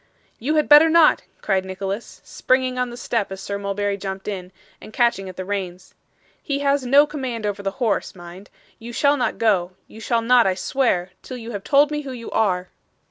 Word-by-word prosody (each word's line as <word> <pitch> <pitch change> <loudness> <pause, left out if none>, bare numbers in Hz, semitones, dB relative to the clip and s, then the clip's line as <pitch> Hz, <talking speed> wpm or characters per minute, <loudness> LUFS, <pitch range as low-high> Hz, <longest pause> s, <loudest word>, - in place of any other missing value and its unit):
'You 290 +7 -1
had 305 - +2
better 300 +2 +8
not,' 325 -1 +5 0.2
cried 190 -2 +1
Nicholas, 195 +3 -6
springing 255 0 0
on 250 -1 0
the 240 - -9
step 230 -5 -2
as 190 - -6
Sir 200 +1 -5
Mulberry 200 0 -2
jumped 190 -1 -6
in, 185 -3 -5 0.3
and - - -11
catching 225 -5 +1
at 185 - -10
the 185 - -5
reins. 185 -2 -5 0.5
'He 280 -2 -2
has 280 -1 +1
no 280 +4 +5
command 260 -7 -5
over 205 -1 -3
the 195 - -1
horse, 225 -7 -1
mind. 175 +3 -12 0.3
You 235 +1 -9
shall 285 +4 +3
not 255 - -1
go 190 -5 +1
you 220 - -13
shall 230 +1 0
not, 240 -2 +5
I 185 - +1
swear 185 -5 0
till 255 - -8
you 235 0 -8
have 200 -3 -6
told 290 +1 +4
me 300 0 -2
who 270 -3 -7
you 235 -2 -8
are. 185 -4 0
225 Hz, 205 wpm, -22 LUFS, 195-255 Hz, 0.5 s, better